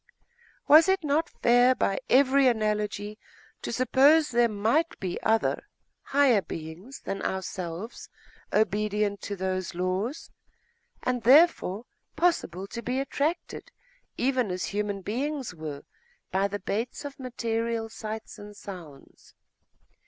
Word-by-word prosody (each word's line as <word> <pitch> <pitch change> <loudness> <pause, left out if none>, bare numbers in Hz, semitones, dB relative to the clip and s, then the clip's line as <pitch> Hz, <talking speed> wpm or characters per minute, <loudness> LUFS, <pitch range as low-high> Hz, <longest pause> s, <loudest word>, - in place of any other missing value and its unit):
Was 315 +5 +8
it 380 -2 +2
not 305 +3 +1
fair 245 +2 +4
by 195 - 0
every 270 +1 +5
analogy 210 -2 -1 0.4
to - - -4
suppose 275 +5 +4
that - - -9
there 240 -1 +5
might 225 +11 0
be 185 -2 -4
other, 225 0 +1 0.4
higher 270 -7 +4
beings 165 - -8
than 195 0 -4
ourselves, 190 +2 -5 0.4
obedient 210 -1 +1
to 205 - -4
those 185 -2 -3
laws, 185 - -2 0.7
and 250 -1 0
therefore 250 - +4 0.3
possible 295 - 0
to 230 +4 -7
be 250 +2 -2
attracted, 295 +5 -2 0.5
even 255 -3 +1
as 180 0 -2
human 205 -1 -2
beings 265 - -3
were, 155 -4 -7 0.5
by 195 +1 +2
the 200 +1 -4
baits 225 +8 -3
of 280 -1 -8
material 230 -2 -2
sights 220 0 -7
and 205 0 -10
sounds?.... 170 -10 -12
220 Hz, 125 wpm, -27 LUFS, 195-265 Hz, 0.7 s, Was